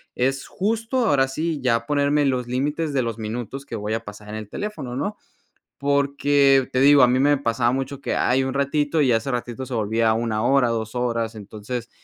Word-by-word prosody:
es 135 +2 -1
justo, 225 +5 -1
ahora 135 -7 +3
sí, 155 +2 -2
ya 115 -2 +1
ponerme 145 +1 +2
los 130 -3 0
límites 145 +5 -1
de 135 - +2
los 115 -2 -3
minutos 120 +5 -5
que 115 - -6
voy 105 +1 -3
a 115 0 -2
pasar 105 0 -11
en 105 - -6
el 110 -2 -7
teléfono, 150 - -5
¿no? 205 +9 -2 0.6
Porque 140 -1 +3
te 130 - +1
digo, 140 0 +7
a 125 - +7
mí 125 +1 +2
me 145 +2 +4
pasaba 120 -2 0
mucho 135 +1 -3
que: - - -2
"Ay, 130 +2 +2
un 130 0 -2
ratito", 145 +2 +1
y 135 - +2
ya 120 - +4
ese 125 +5 -5
ratito 125 +1 -4
se 130 - -5
volvía 110 0 +1
1 110 -1 -1
hora, 135 -1 +3
2 115 -1 -3
horas, 115 -2 -1
entonces 110 +3 -7
130 Hz, 210 wpm, -23 LUFS, 115-140 Hz, 0.6 s, digo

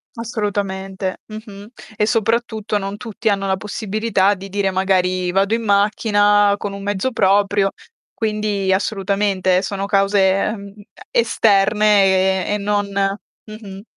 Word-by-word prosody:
Assolutamente. 200 -4 -3
Mh-mh. 215 -2 -10 0.3
E 210 - +2
soprattutto 225 -1 0
non 195 0 -5
tutti 225 0 -3
hanno 195 -1 0
la 190 - +1
possibilità 210 0 0
di 195 0 -9
dire: 200 0 0
"Magari 185 -1 0
vado 195 +3 +1
in 230 0 -1
macchina, 205 0 +3
con 200 -1 -5
un 200 - -8
mezzo 205 +5 -1
proprio", 200 -1 +2 0.4
quindi 210 -3 -1
assolutamente 195 -2 0
sono 195 0 -3
cause, 200 0 +2
ehm, 200 +1 0 0.4
e - - +1
esterne 195 - +3
e - - 0
non 205 0 -1
mh-mh. 200 0 -5
200 Hz, 125 wpm, -19 LUFS, 195-210 Hz, 0.4 s, macchina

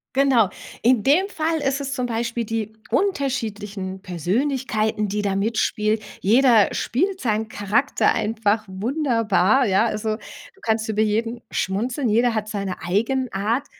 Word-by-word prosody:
Genau. 260 -7 +4 0.3
In 240 -2 +4
dem 345 +9 +3
Fall 320 -2 -1
ist 275 0 0
es 275 0 -3
zum 250 -2 -2
Beispiel 235 0 -2
die 220 0 -3 0.2
unterschiedlichen 210 - -2
Persönlichkeiten, 215 - -1
die 210 +1 -2
da 200 -1 0
mitspielen. 215 0 0 0.2
Jeder 230 0 +5
spielt 375 - -1
seinen 220 -2 0
Charakter 205 +7 +1
einfach 220 0 0
wunderbar, 230 - +2
ja. 195 +4 +3
Also, 215 0 -2
du 390 - -14
kannst 220 0 0
über 215 0 0
jeden 225 +2 -1
schmunzeln, 235 +7 -1
jeder 235 +2 +3
hat 215 0 -2
seine 200 -3 -4
Eigenart. 225 +4 0
225 Hz, 135 wpm, -22 LUFS, 210-260 Hz, 0.3 s, Jeder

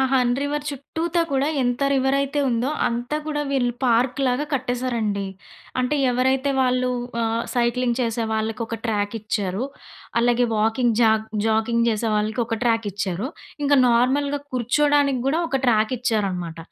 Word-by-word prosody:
'హన్ 250 -2 +3
river' 295 +1 -2
చుట్టూతా 320 +4 -2
కూడా 275 0 +1 0.2
ఎంత 245 +2 0
రివరయితే 275 +2 +1
ఉందో 240 +3 0 0.2
అంతా 240 +5 -2
కూడా 300 -1 -1
వీళ్ళు 250 -3 +1
పార్కు‌లాగా 250 +3 +2
కట్టేశారండి. 245 -6 -1 0.6
అంటే 255 +4 0
ఎవరైతే 260 +2 +1
వాళ్ళు 255 0 +2 0.3
ఆహ్, 230 0 0
సైక్లింగ్ 240 0 +1
చేసే 230 -1 -1
వాళ్ళకి 220 0 -2
ఒక 230 - -4
ట్రాక్ 205 -2 -1
ఇచ్చారు. 205 0 -2 0.6
అలాగే 245 +1 +3
వాకింగ్ 225 +2 +2
జాగ్ 220 -1 +3 0.2
జాకింగ్ 230 +1 +2
చేసే 225 0 0
వాళ్ళకి 215 +3 0
ఒక 225 -1 -2
ట్రాక్ 225 -2 +1
ఇచ్చారు. 195 +2 -2 0.4
ఇంకా 285 0 +4
నార్మల్‌గా 275 +4 +2
కుర్చోడానికి 280 +2 +2
గూడా 310 +5 +2
ఒక 270 - 0
ట్రాక్ 220 -2 +3
ఇచ్చారనమాట. 195 -8 -1
245 Hz, 135 wpm, -23 LUFS, 225-270 Hz, 0.6 s, ఇంకా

